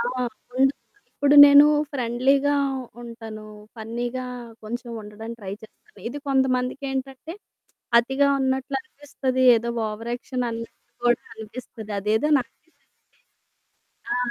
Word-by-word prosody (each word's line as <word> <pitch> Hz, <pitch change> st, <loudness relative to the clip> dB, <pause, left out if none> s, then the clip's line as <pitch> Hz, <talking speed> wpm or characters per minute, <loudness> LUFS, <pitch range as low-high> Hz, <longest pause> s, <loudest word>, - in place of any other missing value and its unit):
ఆ! -, -, 0 dB, 0.5 s
ఉండ్ 270 Hz, +1 st, +4 dB, 0.4 s
ఇప్పుడు 285 Hz, 0 st, +2 dB
నేను 285 Hz, +1 st, +8 dB, 0.3 s
ఫ్రెండ్లీగా 270 Hz, +3 st, +2 dB, 0.5 s
ఉంటాను. 225 Hz, -2 st, -9 dB, 0.3 s
ఫన్నీగా 240 Hz, +3 st, -4 dB, 0.4 s
కొంచెం 240 Hz, +2 st, -6 dB
ఉండడానికి 220 Hz, +3 st, -9 dB
ట్రై 195 Hz, -1 st, -6 dB
చేస్తాను. 430 Hz, -, -18 dB
ఇది 285 Hz, +5 st, -6 dB
కొంతమందికేంటంటే 265 Hz, +2 st, -1 dB, 0.6 s
అతిగా 270 Hz, +4 st, +2 dB
ఉన్నట్లనిపిస్తది. 265 Hz, 0 st, -2 dB
ఏదో 235 Hz, +1 st, -2 dB, 0.2 s
ఓవర్ 220 Hz, +2 st, -6 dB
యాక్షన్ 250 Hz, 0 st, -4 dB
అన్నట్లు 230 Hz, +1 st, -9 dB
కూడా 240 Hz, 0 st, +3 dB
అనిపిస్తది. 220 Hz, 0 st, -9 dB
అదేదో 220 Hz, +9 st, +1 dB
నాకేంటంటే 275 Hz, +6 st, -11 dB, 1.3 s
ఆ! -, -, 0 dB
250 Hz, 100 wpm, -24 LUFS, 230-270 Hz, 1.3 s, నేను